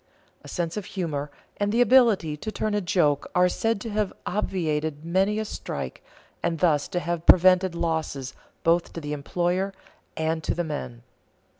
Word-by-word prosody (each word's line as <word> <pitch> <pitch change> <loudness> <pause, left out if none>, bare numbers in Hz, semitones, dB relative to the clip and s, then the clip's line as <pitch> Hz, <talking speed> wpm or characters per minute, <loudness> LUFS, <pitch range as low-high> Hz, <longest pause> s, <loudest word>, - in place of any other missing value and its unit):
A - - -11
sense 170 +1 -3
of 205 - -4
humor 150 -5 -2 0.3
and 205 0 0
the 230 - +1
ability 235 -11 +5
to 215 +9 -5
turn 215 0 -2
a 205 - +1
joke 160 -6 +1
are 180 0 +5
said 225 +3 0
to 225 - -5
have 210 -1 0
obviated 160 -6 -2
many 190 +5 +1
a 220 - -1
strike - - -6 0.4
and 170 -1 0
thus 155 -4 +2
to 175 - -2
have 170 -1 -3
prevented 185 0 +6
losses 160 -6 -2 0.3
both 170 +1 +2
to - - -5
the 150 -2 -4
employer 175 +6 -1 0.4
and 160 0 -1
to - - -1
the 175 - -1
men. 145 -7 -5
175 Hz, 170 wpm, -25 LUFS, 155-195 Hz, 0.4 s, prevented